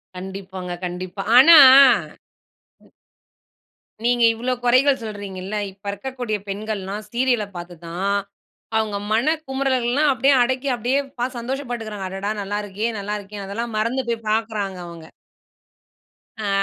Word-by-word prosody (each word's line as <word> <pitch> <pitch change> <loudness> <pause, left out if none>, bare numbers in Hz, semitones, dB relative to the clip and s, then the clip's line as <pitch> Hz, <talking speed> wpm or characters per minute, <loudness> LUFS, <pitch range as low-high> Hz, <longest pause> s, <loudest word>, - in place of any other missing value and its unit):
கண்டிப்பாங்க 190 -1 -7
கண்டிப்பா, 180 +2 -5 0.2
ஆனா. 320 +4 +10 1.3
ம். - - -26 1.1
நீங்க 240 0 +2
இவ்ளோ 245 +3 -2
குறைகள் 260 +3 +4
சொல்றீங்கள்ள, 200 -2 -7 0.2
இப்ப 195 +2 -26
இருக்கக்கூடிய 240 +1 -4
பெண்கள்லாம் 205 0 -4
ஸீரியல 245 -3 +1
பார்த்து 175 0 -8
தான், 195 +4 -1 0.6
அவங்க 215 -2 -1
மனக்குமரல்லாம் 270 +1 +1
அப்டியே 270 +3 +3
அடக்கி 260 +2 -2
அப்டியே 245 +4 0 0.2
பாத் 250 +1 -2
சந்தோஷப்பட்டுகிறாங்க, 235 -5 -5
அடடா! 195 +2 -3
நல்லாருக்கே 205 +2 -3
நல்லாருக்கே, 205 0 -5
அதெல்லாம் 230 +3 -4
மறந்து 235 +5 0
போய் 230 -1 -3
பார்க்குறாங்க 215 -4 -2
அவங்க. 165 -2 -11 1.3
ஆ. 215 -2 -5
215 Hz, 110 wpm, -21 LUFS, 195-250 Hz, 1.3 s, ஆனா